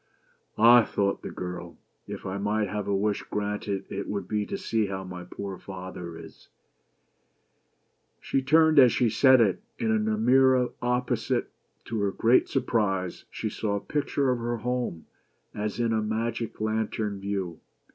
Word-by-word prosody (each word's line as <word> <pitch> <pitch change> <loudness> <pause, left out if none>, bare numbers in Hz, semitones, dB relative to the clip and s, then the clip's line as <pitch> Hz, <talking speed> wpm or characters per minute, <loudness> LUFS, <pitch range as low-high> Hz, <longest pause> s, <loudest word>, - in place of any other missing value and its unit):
" - - -43
"Ah!" 120 +2 +8
thought 100 -2 -1
the - - -6
poor - - -8
girl, 90 -1 -6
" - - -46
If - - -7
I 95 +1 -3
might 105 +1 0
have 105 0 -3
a 100 - +1
wish 100 +1 0
granted 105 -1 -2
it 100 0 -5
would 100 -3 -3
be 105 -1 -1
to - - -3
see 110 -2 0
how 95 -1 -4
my 90 -1 -7
poor 95 +1 -7
father 90 -3 -8
is." - - -13 1.7
She 135 - -1
turned 155 +2 +5
as 125 -3 +8
she 120 -1 +2
said 130 +3 +6
it; 105 -5 +2 0.2
and 225 -2 +1
in 220 0 +1
a 215 - 0
mirror 130 - +4
opposite, 125 +1 0 0.3
to 115 -1 -3
her 100 - +2
great 115 +5 +3
surprise* 95 -5 -1
she 110 - -4
saw 105 -1 -2
a - - -1
picture 140 +1 0
of 125 - -1
her 120 0 -2
home, 120 -7 -3 0.5
as 105 +1 -3
in 115 -1 +1
a 110 - +1
magic 110 +2 -3
lantern 110 -1 -1
view. 95 -4 -3
105 Hz, 175 wpm, -27 LUFS, 100-120 Hz, 1.7 s, Ah